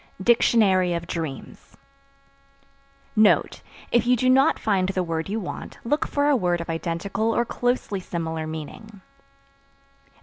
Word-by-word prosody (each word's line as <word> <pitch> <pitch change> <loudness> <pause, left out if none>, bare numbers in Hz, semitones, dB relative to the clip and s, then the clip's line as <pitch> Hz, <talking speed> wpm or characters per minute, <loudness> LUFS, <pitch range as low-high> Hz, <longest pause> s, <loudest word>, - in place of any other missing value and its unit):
DICTIONARY 195 -6 +3
OF 170 0 -4
DREAMS. 160 -6 -7 1.4
(Note. 215 -1 +3 0.3
If 240 -1 +2
you 250 - +5
do 255 +2 +2
not 270 +4 +4
find 190 -3 0
the 185 -1 -1
word 165 0 -3
you 215 +3 -2
want, 185 - -7
look 295 +6 0
for 285 0 0
a 295 - +4
word 175 -7 0
of 170 0 -4
identical 175 +7 -2
or 235 - +1
closely 245 -5 -1
similar 160 -3 -4
meaning.) 175 +7 -8
195 Hz, 135 wpm, -24 LUFS, 170-235 Hz, 1.4 s, you